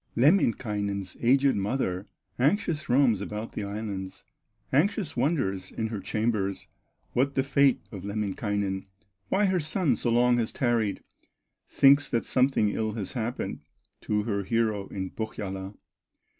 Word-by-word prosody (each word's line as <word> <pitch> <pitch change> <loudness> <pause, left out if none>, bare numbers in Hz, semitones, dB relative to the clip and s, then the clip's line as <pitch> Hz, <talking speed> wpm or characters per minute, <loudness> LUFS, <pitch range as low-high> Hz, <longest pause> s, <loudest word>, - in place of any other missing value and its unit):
Lemminkainen's 105 - +1
aged 135 +3 +4
mother 100 -2 -1 0.3
Anxious 155 - +1
roams 120 -5 +4
about 105 +2 -5
the - - -4
islands, 100 -2 -5 0.5
Anxious 185 - +1
wonders 120 - 0
in 110 0 -3
her 110 -2 -4
chambers, 105 -3 -1 0.5
What 140 +3 +1
the 135 - +2
fate 140 -1 +3
of 100 -5 -7
Lemminkainen, 100 -1 -2 0.4
Why 200 +2 +3
her 190 -2 +2
son 155 - +1
so 120 - -1
long 120 +1 +4
has 115 - -1
tarried; 115 -5 0 0.7
Thinks 140 +1 +5
that 115 - 0
something 130 -5 +2
ill 110 +1 -2
has 105 -3 -4
happened 120 0 -3 0.4
To 105 0 0
her 100 -2 -1
hero 110 -2 0
in 95 -2 -5
Pohyola. 95 -3 -5
110 Hz, 130 wpm, -27 LUFS, 100-135 Hz, 0.7 s, Thinks